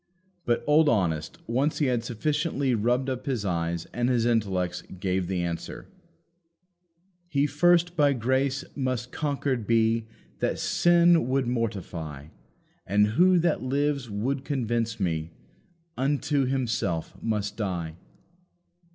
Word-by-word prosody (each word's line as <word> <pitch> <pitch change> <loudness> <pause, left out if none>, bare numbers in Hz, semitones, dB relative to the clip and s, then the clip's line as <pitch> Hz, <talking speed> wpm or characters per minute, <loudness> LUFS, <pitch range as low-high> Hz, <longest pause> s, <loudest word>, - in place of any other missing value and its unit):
But 120 -1 +1
old 150 +1 +5
Honest, 80 -8 0
once 130 +6 0
he 150 - +1
had 125 -3 0
sufficiently 140 +3 -1
rubbed 120 +4 +1
up 130 0 -4
his 125 -7 -1
eyes 85 -2 -1
and 120 +1 0
his 120 -2 +2
intellects, 95 -6 0 0.2
gave 95 -1 -1
the 90 -1 -1
answer: 85 -1 -5 1.4
"He 145 -4 +1
first 175 +4 +3
by 145 -3 +4
grace 130 +3 0
must 130 -3 -2
conquered 140 -6 -2
be 115 0 +2 0.3
That - - 0
sin 175 -4 +4
would 130 0 +1
mortify. 90 - -4 0.6
And 105 +2 +3
who, 180 +11 +4
that 170 -2 +1
lives, 140 -1 -1
would 130 +7 -2
convince 120 -5 -1
me, 80 -4 -1 0.7
Unto 140 +1 +1
himself 115 -11 -1
must 105 -2 -2
die." 90 -7 -3
120 Hz, 125 wpm, -26 LUFS, 100-140 Hz, 1.4 s, old